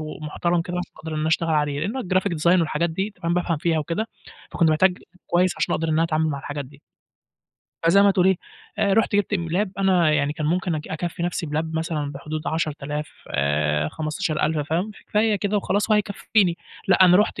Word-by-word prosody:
ومحترم 155 +3 -2
كده 180 +1 -5
عشان 180 - -5
أقدر 160 0 -7
إن - - -2
أنا 155 +1 0
اشتغل 165 0 +1
عليه؛ 150 -2 +1
لإنه 215 +11 -2
الGraphic 185 0 0
design 175 +3 +4
والحاجات 165 +1 0
دي 190 +6 -2
تمام، 170 +1 +1
بافهم 175 -2 0
فيها 165 +1 +1
وكده، 165 +8 -2 0.4
فكنت 165 -2 +2
محتاج 180 +4 +3 0.3
كويس 180 +1 +2
عشان - - 0
اقدر 165 - -1
إن - - +1
أنا 160 - +3
اتعامل 160 -1 +1
مع 140 - -2
الحاجات 145 +1 -5
دي. 140 +2 -16 1.0
فزي 195 +4 +6
ما 200 - +6
تقول 185 -2 +3
إيه، 190 -1 +4 0.4
آآ، 200 -2 +2
رُحت 225 -1 +2
جبت 205 0 +1
م 170 -3 -2
Lap 190 +5 0
أنا 180 -5 +3
يعني 145 -1 +1
كان 150 0 -3
ممكن 175 +1 0
أك 150 -1 -5
أكفّي 170 +2 -4
نفسي 175 -1 -2
بLap 155 +2 -1
مثلًا 155 -4 -2
بحدود 150 +2 -5
10.000 150 -2 -2 0.2
آآ، 75 +2 +1
15.000 155 - -1
فاهم، 175 +7 0 0.2
فهي 210 0 +3
كده 205 +1 0
وخلاص 205 +2 0
وهيكفيني. 200 -3 +2 0.3
لأ 190 0 +6
أنا 180 0 +7
رحُت 210 +3 +1
165 Hz, 200 wpm, -23 LUFS, 155-185 Hz, 1.0 s, أنا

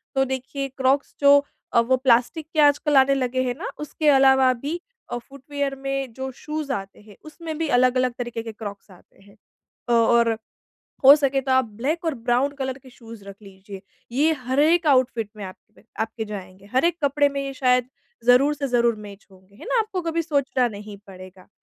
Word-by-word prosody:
तो 270 0 +3
देखिए 265 +1 -4
क्रॉक्स 270 +1 +1
जो 285 0 +6 0.3
अ, - - +5
वो 260 +3 +2
प्लास्टिक 260 +5 +1
के 315 - -1
आजकल 290 0 +3
आने 265 +1 +5
लगे 255 -1 -1
हैं 250 - -1
ना - - -5
उसके 300 +1 -3
अलावा 265 -1 +5
भी 285 +8 -5 0.3
अ, 240 - -2
फुटवियर 275 +2 -5
में 270 -2 -4
जो 265 +2 -5
शूज 300 +2 -6
आते 195 -5 -5
हैं, 210 -1 -16
उसमें 315 0 -7
भी 325 -1 -2
अलग-अलग 255 0 +2
तरीके 240 -2 -4
के 225 - -7
क्रॉक्स 205 -2 -9
आते 185 - -21
हैं। 200 - -20 0.6
और 230 0 +3 0.7
हो 275 +2 +11
सके 275 -2 0
तो 265 - -1
आप 260 0 +4
ब्लैक 305 - -2
और 325 -3 -1
ब्राउन 245 +3 0
कलर 265 0 -3
के 265 -1 -17
शूज 230 -4 -13
रख 200 0 -11
लीजिए। 195 0 -12 0.3
ये 305 +5 +2
हर 260 +3 +1
एक 325 +2 +3
आउटफिट 250 -6 +2
में 205 - -7
आपपे 200 +4 -14 0.2
आपके 220 0 -3
जाएँगे। 195 -2 -9
हर 260 +5 +2
एक 340 -1 +2
कपड़े 285 +1 +3
में 280 0 -4
ये 275 - -5
शायद 250 -2 +2 0.4
ज़रूर 265 +4 +5
से 280 -1 -4
ज़रूर 235 -2 +2
मैच 205 -1 -12
होंगे। 190 +1 -21
है - - -12
ना? - - +1
आपको 425 -4 -3
कभी 330 0 -1
सोचना 280 -5 0
नहीं 205 -1 -9
पड़ेगा। 185 -1 -13
260 Hz, 195 wpm, -23 LUFS, 225-285 Hz, 0.7 s, हो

